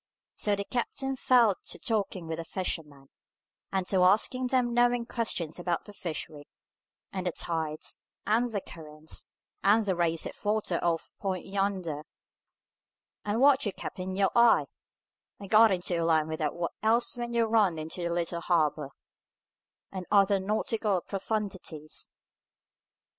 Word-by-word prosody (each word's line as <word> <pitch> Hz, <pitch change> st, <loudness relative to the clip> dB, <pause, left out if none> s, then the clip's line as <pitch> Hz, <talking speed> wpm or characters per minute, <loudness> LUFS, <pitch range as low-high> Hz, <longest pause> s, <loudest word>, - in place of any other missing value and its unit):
So 205 Hz, -1 st, +2 dB
the 200 Hz, -, -3 dB
captain 265 Hz, +5 st, -2 dB
fell 240 Hz, -6 st, +4 dB
to -, -, -3 dB
talking 200 Hz, -7 st, -1 dB
with 160 Hz, 0 st, -4 dB
the -, -, -3 dB
fishermen, 150 Hz, -6 st, -4 dB, 0.6 s
and 190 Hz, -1 st, 0 dB
to 190 Hz, -2 st, +3 dB
asking 220 Hz, +7 st, +3 dB
them 245 Hz, -2 st, +1 dB
knowing 240 Hz, 0 st, +3 dB
questions 180 Hz, -10 st, -1 dB
about 175 Hz, -1 st, -2 dB
the 205 Hz, -, -11 dB
fishery, 155 Hz, -5 st, -6 dB, 0.7 s
and 185 Hz, -2 st, -3 dB
the -, -, +1 dB
tides, 160 Hz, -2 st, -3 dB, 0.3 s
and 235 Hz, +3 st, +2 dB
the 205 Hz, -3 st, -2 dB
currents, 155 Hz, -2 st, -7 dB, 0.4 s
and 210 Hz, +2 st, +4 dB
the 190 Hz, -2 st, +1 dB
race 165 Hz, -1 st, 0 dB
of -, -, -5 dB
water 210 Hz, -4 st, 0 dB
off 170 Hz, -1 st, 0 dB
that -, -, -43 dB
point 190 Hz, -3 st, -2 dB
yonder, 195 Hz, -6 st, -2 dB, 1.2 s
and 210 Hz, +3 st, -1 dB
what 280 Hz, 0 st, +6 dB
you 200 Hz, -, -2 dB
kept -, -, -7 dB
in 185 Hz, +1 st, -4 dB
your 195 Hz, 0 st, +2 dB
eye, 235 Hz, -1 st, +6 dB, 0.7 s
and 200 Hz, -1 st, -10 dB
got 220 Hz, 0 st, +7 dB
into 175 Hz, -2 st, 0 dB
a -, -, +1 dB
line 160 Hz, -2 st, +3 dB
with 160 Hz, 0 st, -4 dB
what 170 Hz, 0 st, -3 dB
else 230 Hz, +2 st, +3 dB
when 240 Hz, -1 st, -4 dB
you 235 Hz, -1 st, +3 dB
ran 215 Hz, -7 st, +3 dB
into 160 Hz, +3 st, -5 dB
the 170 Hz, -, -1 dB
little 170 Hz, 0 st, -1 dB
harbour; 155 Hz, -5 st, +1 dB, 1.0 s
and 185 Hz, -3 st, -6 dB
other 200 Hz, -1 st, +4 dB
nautical 210 Hz, 0 st, 0 dB
profundities. 195 Hz, -7 st, -4 dB
190 Hz, 155 wpm, -29 LUFS, 170-220 Hz, 1.2 s, got